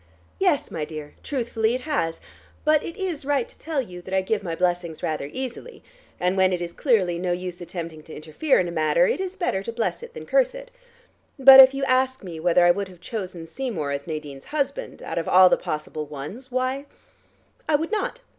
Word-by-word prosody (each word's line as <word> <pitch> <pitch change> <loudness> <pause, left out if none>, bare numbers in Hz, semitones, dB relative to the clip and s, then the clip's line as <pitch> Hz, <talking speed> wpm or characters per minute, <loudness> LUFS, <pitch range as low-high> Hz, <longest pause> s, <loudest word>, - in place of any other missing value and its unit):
"Yes, 360 -7 +1
my 160 -3 -3
dear: 150 -1 -7
truthfully, 235 -4 -1
it 255 - -4
has. 165 - -1 0.5
But 305 -1 +4
it 335 - -7
is 360 -7 -3
right 275 -3 0
to - - -19
tell 315 -2 -2
you 180 -5 -10
that 190 +2 -4
I 190 - +3
give 210 +2 -1
my 170 -4 -4
blessings 175 -2 -1
rather 150 -3 -2
easily, 260 - -7 0.4
and 180 +1 +1
when 190 -1 +4
it 180 - 0
is 170 -1 -5
clearly 185 - +1
no 180 0 0
use 180 0 -5
attempting 165 -2 -6
to 160 - -10
interfere 160 - +1
in 180 - 0
a - - -4
matter, 155 +1 +3
it - - 0
is 380 0 -4
better 270 - -1
to 215 - -5
bless 230 - -2
it 475 0 -11
than - - -8
curse - - +2
it. - - -10 0.7
But 270 0 +10
if 265 0 +9
you 275 - -2
ask 260 -1 +1
me 170 -4 -7
whether 175 +1 +4
I 175 - +7
would 200 +2 -2
have 180 -2 -15
chosen 180 -3 -6
Seymour 175 - -4
as 140 +2 -4
Nadine's 150 -4 -6
husband, 305 - -3
out - - -3
of 165 - -4
all 185 0 +8
the - - +5
possible 150 0 -5
ones, 150 - -8
why, 255 +2 -2 0.8
I 310 - +4
would 320 +5 -1
not. - - -2
190 Hz, 215 wpm, -24 LUFS, 170-275 Hz, 0.8 s, But